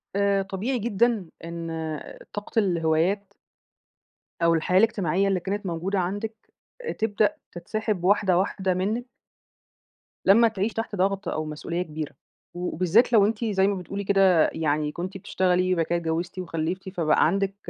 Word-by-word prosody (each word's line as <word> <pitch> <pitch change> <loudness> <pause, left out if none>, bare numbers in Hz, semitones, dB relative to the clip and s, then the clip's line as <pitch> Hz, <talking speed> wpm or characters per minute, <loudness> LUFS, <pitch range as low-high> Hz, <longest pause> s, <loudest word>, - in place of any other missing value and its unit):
آآ 200 -1 +2
طبيعي 200 +7 -2
جدًا 220 -4 +1 0.2
إن 170 0 -5 0.6
طاقة 205 +2 -1
الهوايات 180 +2 +1 1.1
أو 170 0 +4
الحياة 175 +3 +2
الاجتماعية 195 -3 +2
اللي 190 -2 +1
كانت 200 +3 -3
موجودة 185 +3 -1
عندِك، 205 +5 -2 0.6
تبدأ 210 -1 +1 0.2
تتسحب 200 +2 -3
واحدة 190 -2 +3
واحدة 190 0 0
منِك 215 +7 -1 1.2
لمّا 230 +4 +7
تعيشي 215 0 -2
تحت 225 -2 -3
ضغط 195 0 0
أو 155 -2 -2
مسئولية 165 +3 -4
كبيرة، 155 -3 -5 0.4
وبالذات 180 +7 +2
لو 210 -3 +7
أنتِ 225 +2 -1
زي 195 -2 +2
ما 200 - +1
بتقولي 195 +2 -5
كده 190 -4 +4
يعني 150 -1 0
كنتِ 185 +5 -5
بتشتغلي 185 0 +1
بعد 165 -2 +1
كده 175 - 0
اتجوّزتِ 170 +2 -3
وخلّفتِ 175 +2 -3
فبقى 165 -5 +2
عندِك 195 +2 0
190 Hz, 140 wpm, -25 LUFS, 170-205 Hz, 1.2 s, لمّا